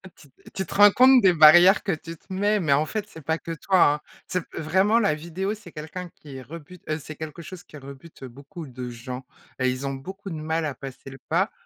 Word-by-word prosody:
Tu 145 - -19
t - - -19
tu 190 - -2
te - - -9
rends 205 0 +8
compte 255 +2 +6
des 185 -2 +5
barrières 175 +5 +7
que 195 - -1
tu 165 0 -6
te 190 - -21
mets, 205 +2 +1
mais 150 -6 +2
en 150 +2 +2
fait, 210 +5 -4
c'est 160 - -12
pas 160 +3 -1
que 165 - -8
toi, 185 +3 +1 0.2
hein. 150 - -10 0.3
C'est 180 -2 -2
vraiment 190 +8 +2
la 200 -8 +2
vidéo, 175 +6 -4
c'est 205 -6 -12
quelqu'un 170 +4 -7
qui 135 -3 -11
rebute, 165 +5 -12
heu, 155 0 -1
c'est 155 +1 -10
quelque 155 +2 -8
chose 185 +1 -10
qui 150 - -13
rebute, 140 +2 -13
heu, - - -6
beaucoup 140 +7 -10
de 125 -1 -7
gens, 125 +2 -8 0.4
heu, 130 - +2
ils 130 +2 -2
ont 135 - -3
beaucoup 190 +9 -8
de 165 - -5
mal 160 +1 -2
à 145 - -3
passer 135 0 -10
le 135 - -11
pas. - - +1
160 Hz, 245 wpm, -24 LUFS, 140-190 Hz, 0.4 s, rends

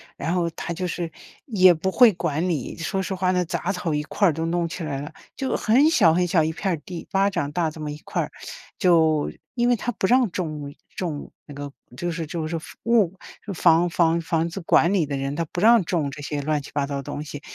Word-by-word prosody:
然 160 +4 -3
后 175 -1 +1
它 170 - -6
就 180 +2 -3
是， 175 -1 -3 0.4
也 185 -7 +6
不 180 +4 -2
会 240 +1 +6
管 170 -1 -1
你， 150 -8 -3
说 190 +4 -2
实 190 0 -3
话 185 0 +1
呢， 180 -1 +1
杂 175 +3 -2
草 180 -2 -2
一 150 - -1
块 200 +6 +1
儿 165 - +2
都 160 +2 -2
弄 170 0 0
起 170 - -5
来 140 -3 -3
了， 150 - -7 0.2
就 265 -1 -2
很 265 +8 +4
小 165 - +5
很 180 +1 +2
小 165 -3 +3
一 160 - 0
片 190 +2 -2
儿 170 - 0
地， 175 -2 -7
巴 195 +1 +2
掌 145 -5 -2
大 165 -1 0
这 155 - -12
么 150 - -4
一 145 - -6
块 - - -2
儿。 - - -3 0.5
就， 160 -4 +3 0.2
因 240 -1 +2
为 245 - +4
他 240 +2 -3
不 205 - -2
让 245 +1 +4
种 155 -6 -4 0.2
种 160 -6 -4 0.2
那 145 - -10
个 145 0 -6 0.3
就 175 +5 -2
是 165 -1 -4
就 160 0 -3
是 165 0 -3
房 - - -12
物 210 -6 +3 0.3
就 200 - -4
房 170 +1 +4
房 170 -1 +2
房 165 0 0
子 170 +3 -6
管 170 +2 +3
理 170 -7 +2
的 140 -2 -2
人， 135 +1 -3
他 170 - -1
不 175 - -3
让 230 -1 +6
种 160 -5 -1
这 145 - -9
些 145 0 -3
乱 150 0 0
七 140 - -11
八 145 -1 0
糟 140 0 -4
的 140 - -2
东 145 - -5
西， 145 -1 -8
170 Hz, 270 characters per minute, -24 LUFS, 155-185 Hz, 0.5 s, 也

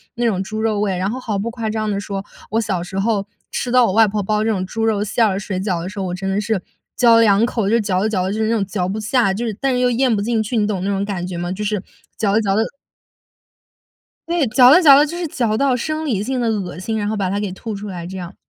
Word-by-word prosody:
那 240 0 -1
种 200 -5 +1
猪 215 +3 -5
肉 220 -2 0
味， 200 -3 0
然 185 +2 -1
后 255 - -4
毫 220 -5 -3
不 220 +4 -3
夸 230 -2 -4
张 215 0 -2
地 200 - -1
说， 200 -1 -5 0.3
我 225 - +1
小 200 -6 -1
时 180 +2 -6
候 205 -1 0 0.2
吃 245 - -2
到 250 -1 +5
我 190 - 0
外 225 +1 +5
婆 205 0 -2
包 210 +2 0
这 225 - 0
种 190 -4 -1
猪 225 +4 -2
肉 210 -2 +1
馅 215 +2 +2
儿 195 -1 -1
水 190 -2 -4
饺 185 -3 -1
的 175 - -5
时 200 +2 -7
候， 190 - -2
我 180 -1 -3
真 190 +1 -5
的 195 +2 0
是 215 -1 -1 0.4
嚼 230 -2 +6
2 215 -1 +4
口 225 -4 -1
就 230 +2 +3
嚼 195 -4 0
着 215 - +1
嚼 185 -4 0
着， 195 - -2
就 215 - -3
是 220 - +1
那 230 - +2
种 205 -3 0
嚼 185 -2 -2
不 205 +3 -3
下， 220 -1 +2
就 215 +5 -3
是 225 - -2
但 270 -2 +1
又 250 0 +2
咽 245 -1 +2
不 - - -1
进 225 +2 0
去， 220 +3 -2
你 210 - +2
懂 200 -3 -2
那 195 - -1
种 200 0 -1
感 190 -4 -3
觉 180 -1 -5
吗？ 175 +1 -3
就 195 +3 -4
是 210 0 -1 0.4
嚼 200 -3 +1
着 220 - +3
嚼 195 -2 0
着 215 - +3 1.7
对， 340 -4 +1
嚼 250 +3 +7
着 340 - +7
嚼 285 -6 +8
着 290 - +5
就 330 +3 -5
是 350 - -2
嚼 240 -7 -1
到 265 +1 +2
生 310 +5 -3
理 215 -9 0
性 255 +3 -2
的 235 - 0
恶 200 -6 -3
心， 220 +4 -3
然 205 - -2
后 215 - -1
把 195 -2 -1
它 200 +2 -1
给 205 -2 -3
吐 215 +3 -6
出 205 +1 -7
来 175 -3 -6
这 190 +2 -7
样。 180 0 -7
210 Hz, 320 characters per minute, -19 LUFS, 195-230 Hz, 1.7 s, 嚼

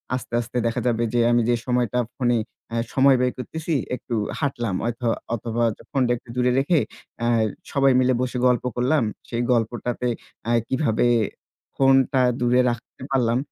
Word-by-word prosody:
আস্তে, 125 -2 -7
আস্তে 120 +1 -6
দেখা 115 - -1
যাবে 115 -1 +1
যে 120 - +2
আমি 120 - +4
যে 120 - +4
সময়টা 125 -1 +1 0.2
ফোনে, 120 -2 +1 0.3
অ্যা 115 - -3 0.2
সময় 135 0 +5
ব্যয় 125 0 +1
করতেছি 160 +5 -4 0.2
একটু 125 - -7 0.3
হাঁটলাম 120 -8 -1
হয়তো 120 +1 -2 0.3
অথবা 115 +1 -2 0.3
ফোনটা 130 -4 +1
একটু 115 - -20
দূরে 125 0 +2
রেখে, 150 +4 +3 0.4
অ্যা 115 - -1 0.4
সবাই 135 -1 +4
মিলে 130 0 +3
বসে 125 0 -2
গল্প 125 -1 +2
করলাম। 130 +3 +2 0.3
সেই 120 0 -1
গল্পটাতে, 120 +1 -1 0.4
অ্যা 115 - +1
কিভাবে 130 -4 +1 0.7
ফোনটা 135 0 +4 0.2
দূরে 125 +1 +4
রাখতে 120 +2 -7
পারলাম 120 -3 +2
125 Hz, 155 wpm, -23 LUFS, 120-130 Hz, 0.7 s, সময়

